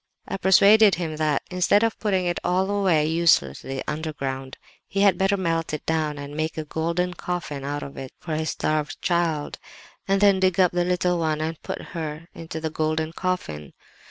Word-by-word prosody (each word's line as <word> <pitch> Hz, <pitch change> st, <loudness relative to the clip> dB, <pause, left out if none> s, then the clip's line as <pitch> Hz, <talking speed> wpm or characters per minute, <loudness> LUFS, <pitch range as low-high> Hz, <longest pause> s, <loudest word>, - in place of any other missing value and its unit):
I -, -, -3 dB
persuaded 200 Hz, +2 st, +6 dB
him 160 Hz, -3 st, -4 dB
that, 155 Hz, -2 st, +1 dB
instead 180 Hz, +4 st, +3 dB
of 225 Hz, -1 st, 0 dB
putting 190 Hz, -4 st, 0 dB
it 175 Hz, 0 st, -1 dB
all 190 Hz, +2 st, +1 dB
away 185 Hz, -7 st, +2 dB
uselessly 135 Hz, -, +1 dB
underground, 135 Hz, -4 st, -4 dB, 0.3 s
he 195 Hz, -, -1 dB
had 200 Hz, -1 st, +5 dB
better 195 Hz, +1 st, +1 dB
melt 165 Hz, -4 st, -1 dB
it 150 Hz, -, -9 dB
down 155 Hz, -2 st, 0 dB
and 145 Hz, 0 st, -7 dB
make 155 Hz, +1 st, -2 dB
a 155 Hz, -, -3 dB
golden 170 Hz, +4 st, -1 dB
coffin 170 Hz, -7 st, -4 dB
out 145 Hz, +1 st, -3 dB
of 140 Hz, -, -9 dB
it 135 Hz, -1 st, -7 dB
for 165 Hz, -, -5 dB
his 155 Hz, 0 st, -1 dB
starved 155 Hz, -1 st, -1 dB
child, 170 Hz, -4 st, 0 dB, 0.5 s
and 195 Hz, 0 st, +2 dB
then 200 Hz, -1 st, +5 dB
dig 185 Hz, -1 st, +2 dB
up 180 Hz, -2 st, +5 dB
the 175 Hz, 0 st, +1 dB
little 180 Hz, -1 st, +1 dB
one 155 Hz, -2 st, 0 dB
and 160 Hz, 0 st, -3 dB
put -, -, -6 dB
her 160 Hz, -1 st, -5 dB
into 165 Hz, -1 st, -7 dB
the 160 Hz, -1 st, -3 dB
golden 155 Hz, +1 st, -1 dB
coffin. 80 Hz, -, -3 dB
165 Hz, 185 wpm, -24 LUFS, 155-180 Hz, 0.5 s, persuaded